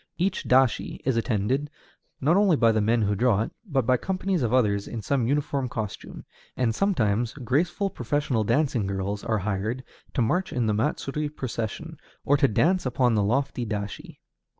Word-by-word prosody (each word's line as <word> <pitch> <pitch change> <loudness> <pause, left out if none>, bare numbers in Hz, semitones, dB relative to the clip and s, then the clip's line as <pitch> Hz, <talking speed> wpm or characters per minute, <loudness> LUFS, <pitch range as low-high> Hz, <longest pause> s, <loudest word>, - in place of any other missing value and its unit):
Each 185 +3 0
dashi 130 -2 +2
is 130 -2 +2
attended, 115 +5 0 0.5
not 155 +6 +3
only 200 -4 +4
by 115 -5 +4
the 110 -1 +1
men 115 +2 +2
who 105 0 +1
draw 105 0 +2
it, - - -6
but 140 - -1
by 130 +1 +3
companies 190 +1 -1
of 115 -3 0
others 105 -6 +2
in 115 -3 -6
some 130 -2 0
uniform 140 -1 0
costume; 110 -3 -6 0.3
and 120 -3 +1
sometimes 115 - +1
graceful 160 - 0
professional 125 -2 -1
dancing 125 -4 +1
girls 100 +1 -3
are 110 -1 0
hired 105 +5 -2 0.3
to 125 - +2
march 180 +11 0
in 120 -2 0
the 110 - +1
matsuri 145 +5 -1
procession, 135 +4 -5 0.3
or 145 - +4
to 140 -1 +4
dance 175 - +2
upon 125 -1 +1
the 105 - +2
lofty 125 +4 0
dashi. 105 -2 -5
125 Hz, 175 wpm, -26 LUFS, 110-145 Hz, 0.5 s, only